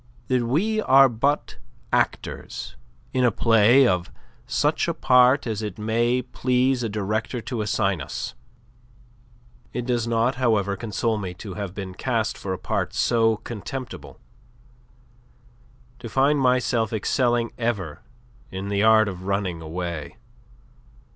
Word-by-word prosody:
that 130 -1 +2
we 200 - +1
are 135 -6 +6
but 140 +5 -1 0.4
actors - - -2 0.4
in 130 - +2
a 125 - +5
play 115 +4 +5
of 90 -4 0 0.4
such - - +1
a - - -1
part 125 +2 +4
as 110 -3 -3
it 105 -4 -5
may 120 +3 +1
please 125 +1 +1
the 115 - -2
Director 110 +4 -2
to 115 0 -4
assign 100 -5 0
us. - - -5 1.4
It 125 - -3
does 120 -2 0
not, 115 +3 +1
however, 105 -5 +2
console 110 +1 -2
me 90 -3 -5
to 95 +2 -8
have 100 -1 -6
been 95 -2 -6
cast 115 +1 -1
for 95 - -6
a 95 - -2
part - - -2
so 115 -2 +2
contemptible, 120 +4 -7 1.8
to 115 - -7
find 140 +5 +3
myself 125 -3 +2
excelling 120 +1 +1
ever 105 -10 -2 0.5
in 95 +1 -5
the 100 0 0
art 110 0 +5
of 95 -1 -6
running 95 -4 -1
away. 80 -1 -5
115 Hz, 135 wpm, -24 LUFS, 100-125 Hz, 1.8 s, are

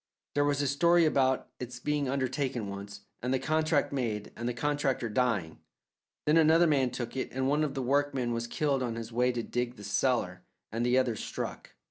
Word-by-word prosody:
There 145 - +2
was 145 0 +1
a - - +1
story 170 +5 +4
about 130 -4 +2
it's 125 -1 -6
being 145 0 -1
undertaken 130 -3 -1
once, 100 +1 -7 0.2
and 125 +2 -1
the 130 - +3
contract 155 0 +1
made, 110 -6 -2
and 120 +1 -3
the - - -2
contractor 140 -2 0
dying; 105 -9 0 0.7
then 150 +2 +4
another 165 +2 +6
man 140 -5 +3
took 120 0 -5
it 130 - -2
and 130 +1 -1
one 150 +2 +2
of 145 -2 -2
the 135 - -2
workmen 135 -2 +1
was 115 0 -2
killed 140 +1 0
on 120 -2 -2
his 115 0 -6
way 125 +2 +2
to 120 -1 -3
dig 125 +1 -2
the 105 - -11
cellar, 105 -3 0 0.3
and 115 +2 -1
the 125 +1 +3
others 125 -4 +1
struck. - - -6
130 Hz, 200 wpm, -30 LUFS, 120-145 Hz, 0.7 s, another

